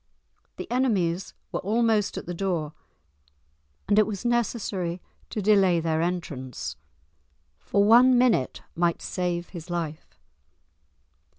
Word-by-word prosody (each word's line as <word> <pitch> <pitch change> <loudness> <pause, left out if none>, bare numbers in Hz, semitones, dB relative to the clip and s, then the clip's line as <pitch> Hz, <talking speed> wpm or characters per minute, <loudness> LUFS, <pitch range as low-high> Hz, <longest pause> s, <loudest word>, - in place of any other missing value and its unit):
The - - -5
enemies 195 -9 0 0.2
were - - -2
almost 220 0 +1
at - - -5
the 175 - -4
door, 170 -5 -2 1.1
and 205 +1 +4
it 215 - +4
was 210 +1 -5
necessary 205 -7 -1 0.3
to 210 - -3
delay 190 -4 +4
their 160 -1 0
entrance, 130 - -4 0.8
for 200 - +1
one 245 +4 +6
minute 240 - +2
might 170 0 0
save 175 -1 -2
his 175 -1 -9
life. 165 -3 -5
185 Hz, 115 wpm, -26 LUFS, 170-215 Hz, 1.1 s, one